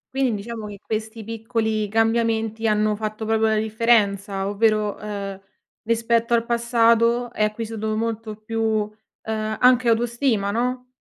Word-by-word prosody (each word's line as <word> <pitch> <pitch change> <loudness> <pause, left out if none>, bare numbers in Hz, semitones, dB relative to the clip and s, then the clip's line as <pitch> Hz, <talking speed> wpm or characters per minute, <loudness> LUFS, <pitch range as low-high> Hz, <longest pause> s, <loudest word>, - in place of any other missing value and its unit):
Quindi 260 -4 +1
diciamo 225 -2 -6
che 205 -1 -8
questi 220 +1 -5
piccoli 220 -1 -2
cambiamenti 225 0 +1
hanno 210 0 +2
fatto 215 +1 -4
proprio 220 0 +2
la 220 - +2
differenza, 210 -3 +1
ovvero, 210 0 +1
ehm, 200 -2 -5 0.4
rispetto 230 +1 +1
al 230 0 +1
passato 235 0 +2
hai 215 - +2
acquisito 220 0 -3
molto 225 -1 -3
più, 225 +1 -4
uhm, 215 -1 0 0.7
anche 250 -1 +5
autostima, 230 -2 +1
no? 250 +3 -1
225 Hz, 130 wpm, -23 LUFS, 215-230 Hz, 0.7 s, anche